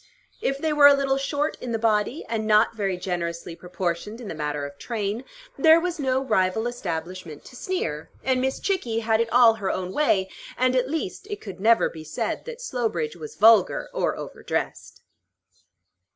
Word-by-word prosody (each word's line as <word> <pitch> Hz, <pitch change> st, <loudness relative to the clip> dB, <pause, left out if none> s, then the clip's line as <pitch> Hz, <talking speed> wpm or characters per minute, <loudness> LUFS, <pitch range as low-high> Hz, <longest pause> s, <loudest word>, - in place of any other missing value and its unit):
If 275 Hz, -, 0 dB
they 310 Hz, +2 st, -1 dB
were 290 Hz, -1 st, +8 dB
a 285 Hz, -, +7 dB
little 275 Hz, -1 st, +1 dB
short 285 Hz, +2 st, -1 dB
in 245 Hz, -2 st, -4 dB
the -, -, +1 dB
body, 220 Hz, +5 st, 0 dB
and 220 Hz, -1 st, -2 dB
not 215 Hz, +1 st, +4 dB
very 195 Hz, -4 st, -1 dB
generously 170 Hz, -2 st, -4 dB
proportioned 180 Hz, +4 st, -4 dB
in 230 Hz, -5 st, -7 dB
the -, -, -4 dB
matter 150 Hz, -2 st, -3 dB
of 140 Hz, 0 st, -10 dB
train, 220 Hz, +1 st, -3 dB, 0.4 s
there 320 Hz, 0 st, +7 dB
was 340 Hz, -1 st, -3 dB
no 265 Hz, -1 st, +1 dB
rival 215 Hz, -2 st, +1 dB
establishment 175 Hz, -7 st, -5 dB
to 250 Hz, -, -13 dB
sneer, 165 Hz, -, -3 dB
and 260 Hz, -1 st, +1 dB
Miss 265 Hz, +1 st, -1 dB
Chickie 245 Hz, -, -1 dB
had 220 Hz, 0 st, +2 dB
it 230 Hz, -, -2 dB
all 240 Hz, -2 st, +7 dB
her 210 Hz, -4 st, -3 dB
own 185 Hz, 0 st, -3 dB
way; 205 Hz, -11 st, +2 dB, 0.3 s
and, 255 Hz, 0 st, +2 dB
at 255 Hz, 0 st, +1 dB
least, 325 Hz, +6 st, -4 dB
it 410 Hz, -, -4 dB
could 190 Hz, -4 st, -9 dB
never 230 Hz, +3 st, +4 dB
be 160 Hz, -1 st, -9 dB
said 155 Hz, -, -3 dB
that 480 Hz, 0 st, -8 dB
Slowbridge 225 Hz, -, -2 dB
was 155 Hz, -3 st, -9 dB
vulgar 220 Hz, -2 st, +5 dB
or -, -, 0 dB
overdressed. -, -, -5 dB
225 Hz, 180 wpm, -25 LUFS, 185-265 Hz, 0.4 s, were